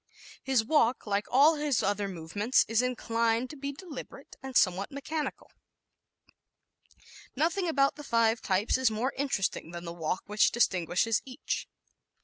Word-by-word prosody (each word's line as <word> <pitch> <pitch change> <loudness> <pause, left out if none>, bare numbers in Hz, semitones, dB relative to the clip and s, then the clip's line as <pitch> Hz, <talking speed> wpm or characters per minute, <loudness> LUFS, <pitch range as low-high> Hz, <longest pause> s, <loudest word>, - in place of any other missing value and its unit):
His 260 -5 +1
walk, 250 -3 +2
like 205 -1 -1
all 295 +5 +5
his 290 -5 0
other 205 0 0
movements, 195 +7 0
is 225 +1 +2
inclined 230 -1 0
to - - -9
be 280 0 -4
deliberate 285 -3 -10
and 265 -2 -1
somewhat 190 +1 +2
mechanical. 295 +2 -5 0.8
¶ - - -29 1.0
Nothing 345 +6 0
about 275 -3 +2
the 295 - -8
five 230 -3 +2
types 200 +6 +1
is 260 -2 +4
more 225 +5 -2
interesting 255 - -1
than 170 0 -8
the 170 - -5
walk 170 +1 -3
which 210 +1 +3
distinguishes 190 0 +1
each. 265 +2 -4
235 Hz, 145 wpm, -29 LUFS, 205-275 Hz, 1.0 s, all